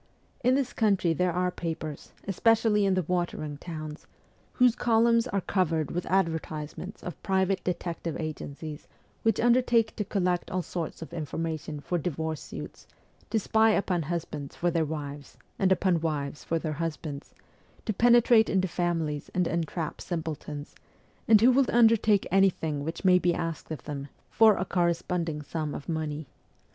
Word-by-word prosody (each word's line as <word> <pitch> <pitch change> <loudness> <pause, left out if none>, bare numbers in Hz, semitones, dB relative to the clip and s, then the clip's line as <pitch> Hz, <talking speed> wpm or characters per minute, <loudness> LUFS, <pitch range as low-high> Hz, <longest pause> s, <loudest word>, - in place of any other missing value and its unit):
In 250 +2 +4
this 275 -2 0
country 195 -6 +2
there 180 +3 +1
are 180 +1 0
papers, 160 -4 -5 0.2
especially 215 +1 +3
in 190 - +2
the 185 - +1
watering 165 -4 -2
towns, 155 -2 -7 0.5
whose 250 -2 +5
columns 230 0 +3
are 200 -5 -1
covered 165 -6 0
with 175 - -3
advertisements 165 -1 -2
of 180 - -7
private 190 0 +1
detective 170 -2 -3
agencies 155 -1 -6 0.3
which 225 -2 +2
undertake 235 -2 +3
to 210 - 0
collect 180 -3 -1
all 185 -1 -1
sorts 165 -2 -5
of 160 - -11
infor 160 -2 -5
mation 155 -2 -4
for 175 - -1
divorce 160 -1 -3
suits, - - -9 0.4
to 225 - +1
spy 220 +1 +3
upon 185 -4 +1
husbands 150 -3 -4
for 175 0 0
WESTERN 165 -2 +1
EUROPE - - -8
301 150 -2 -3
their - - -7
wives 140 - -18 0.2
and 190 -1 +3
upon 185 -3 +2
wives 145 -4 -3
for 165 - 0
their 155 -1 -3
husbands, 155 -3 -5 0.5
to 215 - 0
penetrate 235 0 +5
into 190 -1 +2
families 165 -4 -2
and 180 -1 +2
entrap 165 -1 -3
simpletons, 155 -3 -5 0.5
and 215 -2 +7
who 245 +3 +7
will 265 0 +3
undertake 225 -3 +4
anything 170 -6 +2
which 165 +5 -5
may 180 -1 +6
be 175 -1 +2
asked 165 -2 -4
of 155 -6 -6
them, 140 -2 -5 0.2
for 220 -2 +6
a 185 - -1
corresponding 170 -3 -1
sum 155 0 -3
of - - -8
money. 155 -2 -3
175 Hz, 165 wpm, -28 LUFS, 155-195 Hz, 0.5 s, and